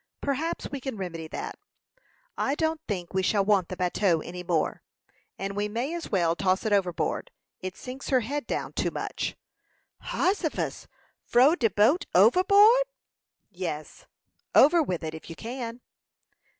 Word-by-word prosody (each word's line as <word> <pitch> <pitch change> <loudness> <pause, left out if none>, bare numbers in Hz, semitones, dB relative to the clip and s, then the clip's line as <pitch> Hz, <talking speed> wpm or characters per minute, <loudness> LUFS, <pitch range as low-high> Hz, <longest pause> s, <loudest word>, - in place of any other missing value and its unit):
"Perhaps 285 +4 -2
we 280 - -4
can 265 -4 -4
remedy 170 -4 -5
that. - - -6 0.8
I 275 - 0
don't 320 0 -1
think 180 -5 -4
we 190 - +2
shall 200 +1 +2
want 195 -4 +3
the 185 - -5
bateau 180 -2 +1
any 180 +2 -7
more, 170 -3 -1 0.6
and 195 +1 -4
we 205 0 0
may 240 +9 -2
as 340 -1 -5
well 170 -4 +2
toss 185 +3 +1
it 215 - +1
overboard. 190 - 0 0.3
It 185 0 -6
sinks 260 +2 -7
her 260 -2 +4
head 280 +3 -3
down - - -3
too - - 0
much." - - -4 0.7
"Hossifus! 370 -4 -1 0.4
Frow 255 +6 +5
de 240 -10 +2
boat 220 - +3
overboard?" 400 - +6 0.7
"Yes; 170 -4 -6 0.5
over 335 +4 +7
with 180 - -2
it, 155 -1 -4
if 160 - -10
you 165 - -7
can." 235 +2 -6
210 Hz, 150 wpm, -27 LUFS, 180-285 Hz, 0.8 s, over